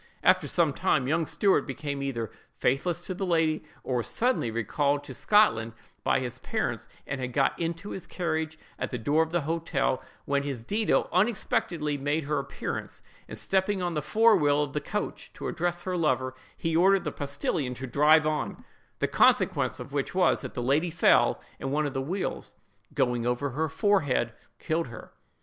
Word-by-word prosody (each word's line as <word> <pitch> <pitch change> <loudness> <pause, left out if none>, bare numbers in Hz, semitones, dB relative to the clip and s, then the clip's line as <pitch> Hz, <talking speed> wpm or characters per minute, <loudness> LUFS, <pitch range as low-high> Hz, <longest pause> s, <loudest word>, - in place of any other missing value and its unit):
After - - +4
some - - +2
time, 130 - +1
young 160 +2 +1
Stuart 200 -2 +2
became 140 +1 -4
either 120 -6 -3 0.3
faithless 170 +7 0
to 185 - -4
the 190 - -4
lady, 165 -3 +1 0.2
or 130 - -1
was 120 - -1
suddenly 245 - +1
recalled 140 +6 0
to - - -8
Scotland 115 - +3 0.3
by - - +3
his 125 -2 -5
parents, - - -2 0.2
and 140 -1 -4
had 125 -1 -4
got 135 0 +1
into 170 +4 -3
his 190 - -6
carriage, 160 -3 -2 0.2
at - - -2
the 125 - -3
door 145 +7 +2
of 160 - 0
the 175 +1 0
hotel, 155 -4 -1 0.2
when 140 0 +1
his 140 -5 -4
Dido 210 - +1
unexpectedly 175 -6 0
made 145 +3 0
her 145 0 0
appearance, 140 0 -5 0.2
and - - -6
stepping 190 0 0
on 175 -1 -1
the 150 - -1
fore 225 +8 +5
wheel 145 -4 +3
of 145 -2 -5
the 150 - -1
coach - - -4
to - - -6
address 175 0 -2
her 185 -1 -2
lover, 130 -6 +1 0.2
he 165 -1 -1
ordered 190 +3 +5
the - - -2
postillion 140 -2 -2
to 130 - -5
drive 150 +5 +5
on; 155 -1 -2 0.3
the - - 0
consequence - - +3
of 140 - -8
which 140 +4 -2
was, 180 -3 +3
that 130 - -7
the 120 - -2
lady 145 +7 +2
fell, 170 +2 +4 0.2
and 135 - -3
one 150 +2 +1
of 145 - -3
the 135 - -1
wheels 180 +8 -4 0.4
going 120 -2 +1
over 125 +3 0
her 155 +5 -1
forehead, 145 - +1 0.2
killed 165 +5 -1
her! 115 - -11
150 Hz, 185 wpm, -28 LUFS, 135-175 Hz, 0.4 s, fore